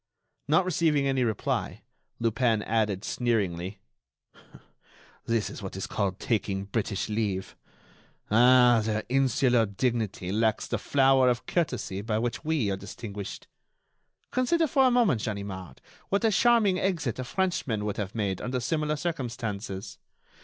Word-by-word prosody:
Not 160 +6 +3
receiving 160 -5 +2
any 135 -2 +1
reply, 110 -3 -2 0.3
Lupin 115 -1 +1
added, 105 -3 0
sneeringly: 100 -5 -1 1.4
"That 115 -2 0
is - - -8
what 95 -2 -6
is 95 - -3
called 95 -3 -2
'taking 100 -4 -1
British 100 -1 -2
leave.' 105 -3 -2 0.8
Ah! 120 +1 +6
their 110 0 -1
insular 125 -3 +3
dignity 105 -3 -2
lacks 110 +1 +1
the - - -2
flower 135 -2 +4
of 120 -1 -1
courtesy 125 - -1
by 110 0 -1
which 120 +1 -2
we 150 -10 0
are 95 - -2
distinguished. 100 0 -7 0.8
Consider 320 +7 +2
for 270 -3 +3
a - - +5
moment, 225 - +2
Ganimard, 95 - -5 0.3
what 200 +4 +1
a 220 - +4
charming 215 -4 +4
exit 165 - -1
a - - -2
Frenchman 125 - -1
would 105 - -3
have 105 +1 -4
made 100 -4 -1
under 125 +1 -2
similar 150 +4 -1
circumstances! 115 - -4
115 Hz, 135 wpm, -27 LUFS, 105-140 Hz, 1.4 s, Ah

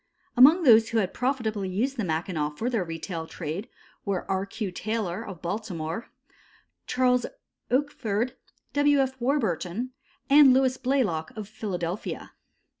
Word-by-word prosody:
Among 300 +8 +7
those 225 -5 +7
who 230 - 0
had 200 -4 +2
used - - -22
profitably 220 -5 0
the 270 -4 -3
Mackinaw 160 -3 -2
for 235 +9 -2
their 225 -6 +1
retail 165 0 -5
trade 165 +7 -5 0.3
were 195 -3 -2
R. 195 0 -1
Q. 205 -1 -4
Taylor, 205 -2 -3
of 185 -4 -9
Baltimore, 175 0 -4 0.8
Charles 250 -1 +2 0.4
Oakford, 250 -4 0 0.4
W. 290 0 +4
F. 265 -2 0
Warburton 235 - -1 0.4
and 275 -2 +7
Louis 260 -1 +2
Blaylock, 245 - 0
of 210 -2 -5
Philadelphia. 190 -4 -4
220 Hz, 130 wpm, -27 LUFS, 180-255 Hz, 0.8 s, Among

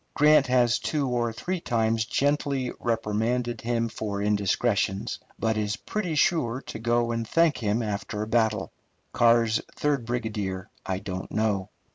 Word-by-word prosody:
Grant 150 -1 +5
has 125 -2 +3
two 145 -3 -1
or 120 -2 0
three 180 +11 -3
times 115 -3 +1
gently 140 -1 0
reprimanded 115 +1 -1
him 115 0 0
for 105 -3 -4
indiscretions, 100 0 0 0.2
but 110 -1 0
is 105 -1 0
pretty 185 -7 -3
sure 145 -8 +2
to 110 - -8
go 120 +1 +1
and 115 -1 -2
thank 165 +1 +3
him 110 +1 0
after 105 0 -3
a - - -5
battle. 110 -1 +1 0.4
Carr's 115 -1 +4
third 140 -6 0
brigadier 105 -6 -3
I 95 - -2
don't 95 -1 -6
know. 105 -3 0
115 Hz, 145 wpm, -26 LUFS, 105-125 Hz, 0.4 s, Grant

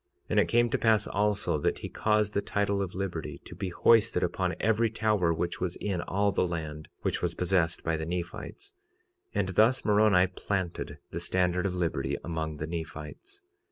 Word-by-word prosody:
46:36 - - -47
And - - +4
it - - +3
came 120 0 +3
to - - +2
pass 110 -3 +3
also, 105 -4 0
that - - 0
he - - -6
caused 105 -1 +1
the 100 - +1
title 100 -1 0
of 95 -2 -4
liberty 95 -4 -4
to - - -9
be 95 +2 -4
hoisted 115 +1 +4
upon 90 +1 0
every 115 +1 +2
tower 105 -6 +1
which 85 +1 -2
was 90 -1 -1
in 95 -4 -2
all 100 +3 +1
the 90 - +1
land, 80 -3 -5 0.2
which - - -1
was - - -1
possessed 90 -2 +1
by 80 -1 0
the 80 - -3
Nephites; 90 - -5 0.6
and 95 - +1
thus 110 +7 +3
Moroni 105 -3 +5
planted 95 -1 -3
the - - -3
standard 90 0 +1
of 90 - -3
liberty 70 -6 -1
among 80 -2 -3
the 75 - -3
Nephites. 85 - -7
95 Hz, 190 wpm, -29 LUFS, 85-105 Hz, 0.6 s, Moroni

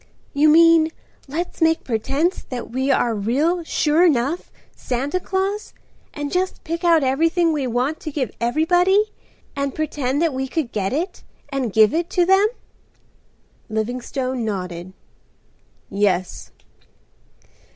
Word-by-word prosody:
"You 295 +2 +4
mean, 330 0 +6 0.4
let's 335 +6 -4
make 325 0 +3
pretense 275 - -1
that 245 -3 -6
we 265 +3 -1
are 245 -3 +2
real 280 - 0
sure 315 +1 +2
enough 300 0 +1 0.2
Santa 275 +8 -2
Claus 390 +3 -2 0.4
and 290 -1 -5
just 370 +1 -1
pick 335 +2 -4
out 335 -3 +4
everything 325 +5 +2
we 280 -4 -1
want 250 +6 -1
to 310 - -6
give 275 -5 -2
everybody, 355 - +2 0.4
and 280 -1 -2
pretend 290 -3 -1
that 325 -4 +1
we 265 +1 -2
could 265 -3 -3
get 195 -2 -1
it 345 +7 -3 0.3
and 270 -5 -2
give 215 +1 +5
it 335 +2 -1
to 355 - +5
them?" 385 +3 +5 1.2
Livingstone 245 +3 -3
nodded. 180 -4 -4 0.9
"Yes." 190 -3 -1
285 Hz, 130 wpm, -21 LUFS, 245-335 Hz, 1.2 s, mean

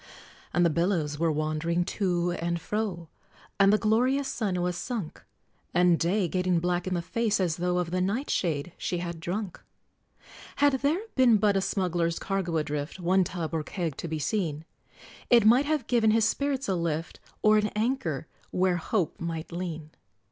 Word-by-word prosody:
And 175 +1 +3
the 170 - +3
billows 165 -3 0
were 165 -1 +2
wandering 155 +3 0
to 175 -3 0
and 170 0 -2
fro, 195 -4 -3 0.5
And 195 0 +6
the 210 - +5
glorious 250 +6 +2
sun 200 -8 -1
was 180 0 -1
sunk, 205 -2 -5 0.5
And 175 -1 +4
Day, 185 +3 +1
getting 180 0 +1
black 175 +1 -1
in 185 - 0
the 170 - -2
face, 220 +2 0
as 175 -4 0
though 180 +1 0
Of 175 -2 -1
the 185 0 0
nightshade 180 - -1
she 180 - -2
had 170 -1 -5
drunk! 185 +3 -4 0.9
Had 285 -1 +4
there 300 +7 +1
been 250 -4 +5
but 205 -1 +2
a 195 - +2
smuggler's 175 -4 0
cargo 190 -4 -1
adrift, 150 +2 -3
One 185 +2 +3
tub, 170 -2 -4
or 160 - 0
keg, 165 -2 -4
to - - -5
be 160 -1 -3
seen, 155 -1 -2 0.6
It 235 -3 +6
might 245 +6 +6
have 305 -5 0
given 230 -3 +3
his 220 0 +4
spirits 275 +3 -1
a 195 - +1
lift 165 -1 -2 0.2
Or 215 0 +6
an 210 - +1
anker 210 - -1 0.2
where 185 -1 +1
Hope 175 -1 -1
might 165 -1 -4
lean! 165 -3 -5
180 Hz, 175 wpm, -27 LUFS, 170-215 Hz, 0.9 s, And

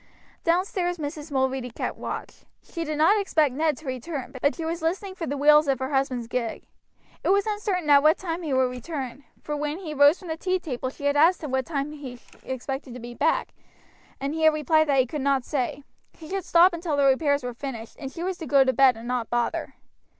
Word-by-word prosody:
Downstairs 355 0 0
Mrs. 300 0 -6
Mulready 265 -2 0
kept 230 - -4
watch. - - -7 0.2
She 335 - -5
did 305 -1 -3
not 395 +8 +4
expect 310 -8 +2
Ned 305 0 +1
to 310 - -14
return, 260 +1 -5
but 285 - +2
she 330 - -5
was 335 +1 -3
listening 375 +4 -2
for 350 -3 -5
the 285 - -2
wheels 300 +1 +6
of 270 -1 +2
her 260 +3 -4
husband's 265 -4 0
gig. 235 -2 -3 0.6
It - - 0
was 395 +1 +3
uncertain 415 -6 -2
at 280 -1 +8
what 310 +2 +5
time 340 -1 -4
he 315 -4 -4
would 260 -1 +2
return; 260 0 -6 0.2
for 300 - -3
when 295 +1 -2
he 340 -5 -6
rose 290 +3 +6
from 365 - -11
the 320 - -3
tea 370 +2 0
table 260 -8 -4
she 285 +2 -9
had 285 0 +2
asked 330 +4 +4
him 295 - -4
what 260 -1 0
time 290 -2 -2
he 270 -5 -8 0.2
expected 260 0 -5
to - - -7
be 240 0 -8
back, 310 +6 0 0.7
and 275 +2 -2
he 320 - -3
had 315 -1 +5
replied 310 +1 +3
that 275 -2 +3
he - - 0
could 290 +3 -5
not 270 -2 +1
say; 275 0 -2 0.3
he 315 - -11
should 385 +1 -3
stop 345 +1 +5
until 330 -3 -2
the 280 - +3
repairs 285 +1 +3
were 245 0 -4
finished, 235 -3 -7
and 270 -1 -6
she 335 - -6
was 370 0 -3
to 320 - -6
go 275 -2 +5
to 260 0 +1
bed 260 -1 +5
and 230 +1 -9
not 245 -2 -2
bother. 240 0 -1
290 Hz, 230 wpm, -25 LUFS, 260-330 Hz, 0.7 s, at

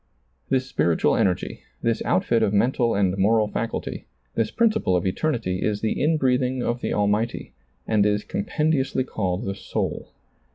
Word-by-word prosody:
This 130 -1 +1
spiritual 85 -10 +1
energy, 90 -2 0 0.2
this 115 -1 +1
outfit 115 +5 +2
of 105 - +2
mental 120 +2 +2
and 95 -2 +2
moral 110 +2 +3
faculty, 115 +2 -4 0.3
this 115 -2 0
principle 220 - +2
of 90 - 0
eternity 95 -3 -1
is 105 -1 -1
the 110 - -1
in 155 +3 +3
breathing 130 -2 +1
of 120 +1 -1
the - - -2
Almighty, 105 - 0 0.3
and 110 -2 +2
is 105 0 +1
compendiously 135 +4 0
called 95 -4 -2
the 100 - -2
soul. 100 - -3
110 Hz, 155 wpm, -24 LUFS, 100-130 Hz, 0.3 s, moral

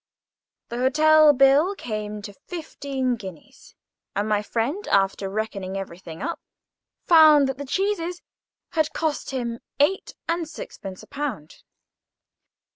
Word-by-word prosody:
The 235 - -4
hotel 310 +3 +6
bill 280 +7 +4
came 210 - -5
to 205 - -8
fifteen 275 - -3
guineas; 190 -7 -12 0.4
and 205 +2 0
my 210 -1 +2
friend, 240 - -2
after 195 0 +2
reckoning 195 -2 -3
everything 175 -2 -7
up, 335 +1 -3 0.7
found 310 -4 +7
that 265 0 -4
the 285 - -4
cheeses 360 0 -1 0.5
had 315 -3 0
cost 315 -3 -2
him 235 -3 -3 0.2
eight 340 +7 +1
and 335 -1 -1
sixpence 195 -11 -8
a - - -14
pound. 265 - -5
270 Hz, 120 wpm, -24 LUFS, 210-310 Hz, 0.7 s, found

